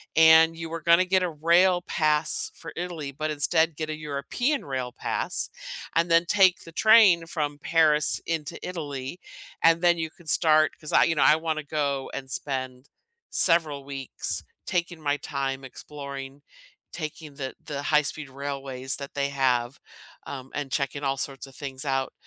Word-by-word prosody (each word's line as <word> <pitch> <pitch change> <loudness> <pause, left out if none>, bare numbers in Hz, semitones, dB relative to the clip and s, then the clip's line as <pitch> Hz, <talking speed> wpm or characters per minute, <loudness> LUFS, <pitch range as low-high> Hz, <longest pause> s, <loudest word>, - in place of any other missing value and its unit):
and 160 0 +7
you 165 0 -6
were 165 0 -5
gonna 170 +3 +5
get 185 +1 +2
a 180 - 0
rail 170 +3 +3
pass 155 -2 0
for 165 - -10
Italy, 165 -5 -5
but 155 +3 -3
instead 160 +2 +1
get 155 -1 -3
a - - -3
European 155 - -2
rail 130 -3 -3
pass, - - -2 0.5
and 170 +1 +2
then 165 +1 +5
take 190 -2 +4
the 165 - -12
train 200 -4 +6
from 145 -3 -3
Paris 155 -1 +2
into 165 0 -3
Italy, 145 -3 -5 0.4
and 165 +1 +5
then 175 -1 +5
you 160 -1 -2
can 170 0 -20
start" 155 -1 +4
'Cause 155 - -6
I - - +6
you 165 - +1
know, 145 - +1
I 150 - +7
wanna 160 -1 -2
go 140 -2 -2
and 135 -1 -6
spend 130 -1 -4 0.4
several 160 -5 +2
weeks 135 -2 -4 0.2
taking 175 -2 -2
my 145 -1 0
time 135 -2 -3
exploring, 140 0 -8 0.5
taking 155 -2 -7
the 135 -2 -5
the 140 -1 -5
high-speed 150 -1 0
railways 135 -1 -4
that 140 -1 -8
they 140 0 -1
have, 130 -2 0 0.5
um, 130 -1 -7
and 145 -2 -4
checking 140 +1 -2
all 135 0 0
sorts 135 0 -3
of 135 - -15
things 135 -1 -6
out. 135 -1 0
150 Hz, 165 wpm, -26 LUFS, 140-165 Hz, 0.5 s, and